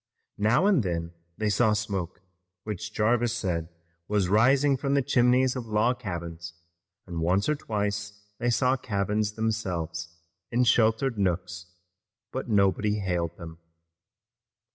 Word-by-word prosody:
Now 110 - +3
and 200 -9 +4
then 85 -3 -3 0.2
they 110 -1 0
saw 110 +1 +3
smoke, 100 -5 -3 0.4
which 105 0 -5
Jarvis 115 +2 +1
said 85 -7 -2 0.4
was 100 -4 +1
rising 135 +7 +4
from 140 +1 -1
the 140 - +2
chimneys 125 +1 +3
of 125 -3 -5
log 110 +4 +1
cabins, 85 -5 -6 0.5
and 85 -2 -5
once 95 +4 +2
or 150 - +3
twice 105 -5 -3 0.2
they 120 +1 +1
saw 125 +2 +2
cabins 105 -2 -1
themselves 85 -7 -3 0.3
in 125 +1 +3
sheltered 115 0 +2
nooks, 90 -1 -2 0.6
but - - -4
nobody 105 0 +2
hailed 90 -4 -2
them. 80 -2 -10
105 Hz, 130 wpm, -27 LUFS, 90-120 Hz, 0.6 s, and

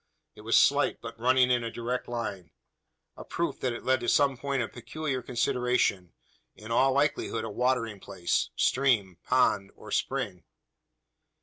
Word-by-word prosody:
It 105 - -14
was 115 +2 +3
slight, 145 +1 +4
but 115 -1 -9
running 125 +1 +4
in 120 -1 +2
a 115 - -3
direct 120 +2 -4
line 105 -8 -5 0.7
a - - -9
proof 170 -5 -3
that 130 - -1
it 120 - -6
led 130 0 +2
to 120 - -1
some 140 -3 +3
point 140 0 -2
of - - -7
peculiar 135 +2 -4
consideration 120 -6 0 0.4
in 110 +2 -10
all 135 +3 +4
likelihood 140 -5 0
a 110 - -5
watering 120 -3 0
place 95 -3 -1
stream, 110 -10 +1
pond, 105 -6 +2
or - - -12
spring. 90 -2 -2
120 Hz, 160 wpm, -28 LUFS, 110-130 Hz, 0.7 s, slight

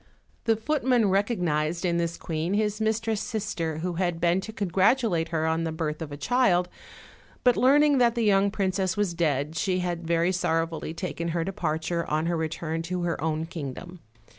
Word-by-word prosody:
The 225 - +3
footman 245 -3 +1
recognized 175 -6 0
in 170 -1 +1
this 170 0 -2
queen 165 +4 -2
his 210 0 0
mistress' 220 0 0
sis 215 -1 -3
ter, 160 -2 -2
who 175 +2 -2
had 175 -2 0
been 175 +2 +2
to 220 - -7
congratulate 195 -2 +2
her 160 -1 0
on 160 +1 0
the 165 - -2
birth 160 -1 -3
of 155 -3 -5
a 145 - -6
child; 185 - +2 0.8
but 245 -1 +5
learning 285 +2 +4
that 240 -1 +4
the 235 - 0
young 200 -1 +4
princess 190 -2 -1
was 205 -4 0
dead, 155 -2 0
she 185 +3 0
had 175 -2 -3
very 170 +1 +2
sorrowfully 165 -2 -1
taken 170 -1 -4
her 170 0 -1
departure 170 -2 -2
on 155 +1 0
her 170 0 0
re 160 -1 -1
turn 160 0 -3
to 175 +1 -3
her 170 -3 -2
own 160 0 -1
kingdom. 165 +2 -7
175 Hz, 190 wpm, -26 LUFS, 165-205 Hz, 0.8 s, but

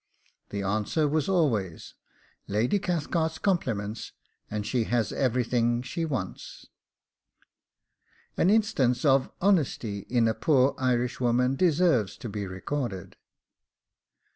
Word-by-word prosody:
The 100 -1 -4
answer 110 - 0
was 155 +3 0
always, 115 - 0 0.5
'Lady 115 - +1
Cathcart's 160 -2 -1
compliments, 115 - -2 0.4
and 105 -1 -3
she 120 0 0
has 120 -2 0
everything 120 -1 +1
she 165 +5 -3
wants.' 130 - -5 1.7
An 180 - +3
instance 180 - +2
of 135 -2 +4
honesty 145 - +1
in 120 -2 +3
a 110 - +2
poor 135 -1 +3
Irishwoman 125 0 +1
deserves 155 - +2
to 120 - -7
be 100 -1 -4
recorded. 95 +1 -4
125 Hz, 105 wpm, -27 LUFS, 110-155 Hz, 1.7 s, of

